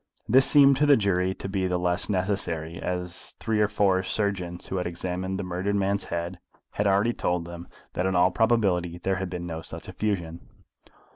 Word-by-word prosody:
This 130 +4 +5
seemed 140 -2 +6
to 150 +1 +3
the 145 - +7
jury 95 -3 +1
to - - -6
be 95 -1 -1
the 90 0 0
less 90 +2 0
necessary, 90 -4 -2
as 90 0 -4
three 110 -1 0
or 105 - +4
four 100 -2 +2
surgeons 95 -3 -2
who 95 - -3
had 90 - -1
examined 90 +2 -3
the 100 - -3
murdered 90 +3 -2
man's 100 0 0
head 85 +1 -4 0.3
had 105 - 0
already 100 +4 +3
told 90 -5 -1
them 85 0 -9 0.3
that 90 - 0
in 95 - 0
all 90 +1 +4
probability 95 -7 +1
there 95 +1 -1
had 95 -1 -3
been 90 -1 -5
no 80 -2 -5
such 80 - -9
effusion. 85 -6 -2
95 Hz, 195 wpm, -26 LUFS, 90-100 Hz, 0.3 s, the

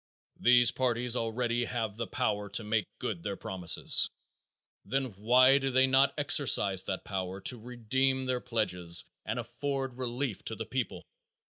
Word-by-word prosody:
These 120 0 +5
parties 125 -1 0
already 120 +1 -1
have 115 -4 -3
the 115 0 -4
power 105 -1 -2
to 100 +3 -1
make 105 0 -1
good 95 -6 -4
their 100 +3 -4
promises, 90 -3 +2 0.7
then 135 -2 -2
why 125 +7 +4
do 135 0 -1
they 130 0 +4
not 135 +2 +3
exercise 125 -10 +3
that 95 - -4
power 95 -1 -4
to 120 +5 0
redeem 130 +3 -1
their 125 -1 -1
pledges 90 -7 +1 0.2
and - - -2
afford 135 -3 -4
relief 125 -3 -3
to 110 - -3
the 115 - -6
people? 125 +2 -4
120 Hz, 150 wpm, -30 LUFS, 105-130 Hz, 0.7 s, These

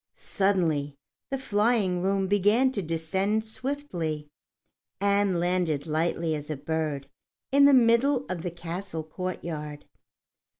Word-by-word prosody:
Suddenly 165 -8 0 0.3
the 270 - -1
flying 210 -6 +1
room 195 +1 +1
began 205 +7 +3
to 210 - -2
descend 190 +6 -1
swiftly, 200 - -4 0.7
and 200 -2 +2
landed 175 -4 0
lightly 165 +1 0
as 150 0 -5
a 155 - -3
bird 150 -1 -2 0.4
in 280 +1 +6
the 285 - +7
middle 250 +3 +4
of 180 -3 -4
a 180 - -1
castle 170 0 -5
courtyard. 155 -3 -5
180 Hz, 120 wpm, -27 LUFS, 160-210 Hz, 0.7 s, the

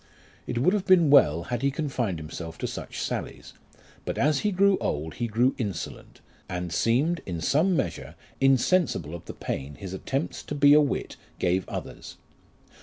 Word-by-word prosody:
It 120 - -3
would 150 +11 +3
have 205 -1 -1
been 175 -6 +5
well 85 - +5
had 120 +5 -3
he 140 - +2
confined 130 - -2
himself 80 +1 -7
to - - -4
such - - -6
sallies; - - -5 0.5
but - - -4
as 145 0 +2
he 210 - 0
grew 195 +1 +3
old 75 +2 -2
he 120 - -3
grew 120 +4 +2
insolent, 100 -6 -5 0.3
and 90 -1 -4
seemed, 135 - +1
in 85 -3 -3
some 160 - +2
measure, 85 - -3 0.2
insensible 135 - +2
of 85 - -8
the - - -8
pain 70 +2 -5
his 95 +2 -8
attempts 135 - -3
to 145 - -4
be 145 0 +6
a 150 - +7
wit 145 - -2 0.2
gave 90 +1 0
others. - - -7
125 Hz, 175 wpm, -26 LUFS, -, 0.5 s, a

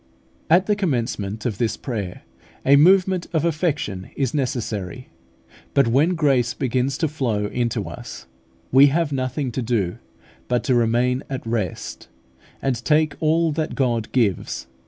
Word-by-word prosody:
At 175 +4 +5
the 210 - +2
commencement 115 - -2
of 110 -5 -2
this 115 -2 0
prayer, 105 -9 -5 0.4
a 140 - +6
movement 185 +3 +4
of 160 -1 +1
affection 150 - -1
is 135 -4 -1
necessary; 115 - -3 0.7
but 140 -3 +4
when 145 +10 +3
grace 135 -7 +2
begins 130 +1 0
to 160 - +1
flow 120 -9 -1
into 120 +2 -2
us, - - -9 0.5
we 135 +2 +8
have 155 +2 +1
nothing 130 0 -2
to 130 - -3
do 110 -7 -1 0.5
but 120 -2 0
to 130 - +1
remain 120 +2 +2
at 130 -3 -5
rest, 110 -7 -3 0.6
and 125 -3 -1
take 150 +3 +3
all 160 +1 +2
that 155 +1 -2
God 120 -4 0
gives. 105 - 0
130 Hz, 145 wpm, -22 LUFS, 115-150 Hz, 0.7 s, we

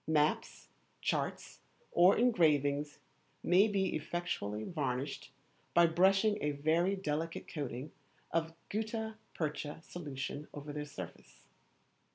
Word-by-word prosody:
Maps, 155 -1 +1 0.3
charts, - - -2 0.3
or 180 +3 +6
engravings 150 - +3 0.5
may 185 +5 +6
be 195 -2 +1
effectually 145 -10 -2
varnished 135 -2 -3 0.4
by 170 - +8
brushing 195 +5 +4
a 150 0 +1
very 165 +7 +2
delicate 165 -3 -3
coating 140 -1 -4 0.4
of 165 0 0
gutta 220 +1 -2 0.2
percha 150 -1 -3
solution 145 -3 -5
over 145 0 -6
their 150 0 -3
surface. 95 - -10
155 Hz, 105 wpm, -34 LUFS, 145-180 Hz, 0.5 s, by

